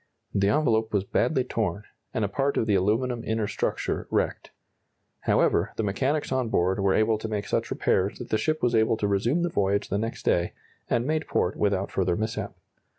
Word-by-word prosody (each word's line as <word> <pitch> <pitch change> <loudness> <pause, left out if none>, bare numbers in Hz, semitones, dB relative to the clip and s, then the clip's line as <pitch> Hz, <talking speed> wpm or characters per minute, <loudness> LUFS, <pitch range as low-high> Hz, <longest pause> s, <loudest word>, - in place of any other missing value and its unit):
The 100 0 +2
envelope 110 -6 +2
was 100 -2 +2
badly 130 +6 +1
torn, 105 -6 -2 0.3
and 110 - 0
a - - 0
part 135 +7 0
of - - +2
the 105 - +1
aluminum 115 +5 +1
inner 110 -1 -1
structure 105 - -2
wrecked. - - -1 0.8
However, - - +3
the 110 - -1
mechanics 130 +10 0
on 130 -3 0
board 95 0 +1
were 95 -1 +2
able 110 0 +2
to 110 - -4
make 105 -2 -2
such - - -1
repairs 95 +3 +1
that 125 - -8
the 110 - +2
ship 155 +7 -1
was 120 -1 +2
able 110 0 +3
to 105 - 0
resume 115 - +1
the 175 - +1
voyage 100 -7 0
the 100 - 0
next 115 +2 -4
day, 85 0 +1 0.4
and 120 - +1
made 155 +2 -1
port 90 - 0
without 100 -1 0
further 90 -2 +1
mishap. 110 +1 -3
110 Hz, 200 wpm, -26 LUFS, 100-125 Hz, 0.8 s, However